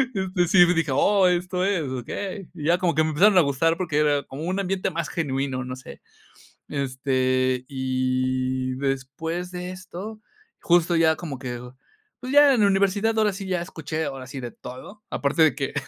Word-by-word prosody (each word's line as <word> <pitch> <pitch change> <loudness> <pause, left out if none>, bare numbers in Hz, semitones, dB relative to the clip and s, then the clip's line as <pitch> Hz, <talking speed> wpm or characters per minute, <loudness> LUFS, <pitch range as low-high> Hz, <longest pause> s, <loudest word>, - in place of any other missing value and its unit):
Este, 185 -2 0
sí 175 0 +7
me 180 - +2
dije: 165 -3 0
"Oh, 195 +4 +4
esto 180 +1 0
es, 190 -6 +1
okey." 185 - -5
Y 155 -4 -8
ya 175 +2 +4
como 175 -3 +1
que 155 - +4
me 155 - 0
empezaron 190 +5 +5
a - - +7
gustar 155 +4 +1
porque 155 -5 -1
era 145 -2 +2
como 140 +4 -8
un 185 +3 -1
ambiente 190 0 -1
más 165 -2 -3
genuino, 135 -4 -2
no 130 0 -6
sé. 130 - -12 0.7
Este, 130 -2 0
y 130 -1 -1
después 140 +6 -3
de 180 0 -5
esto, 190 +4 -8 0.4
justo 175 0 +3
ya 160 -1 +4
como 150 -7 -6
que 125 -2 -5 0.6
pues 255 +1 -5
ya 290 -1 +7
en 235 - +1
la 200 - +5
universidad 200 +3 +1
ahora 215 -1 +3
sí 195 +1 -7
ya 185 -2 -1
escuché, 160 -2 -4
ahora 135 -1 -6
sí 135 - -7
de 120 -2 -6
todo, 200 +12 -11
aparte 145 +3 +1
de 155 - +5
que 135 -2 -3
160 Hz, 190 wpm, -24 LUFS, 130-185 Hz, 0.7 s, sí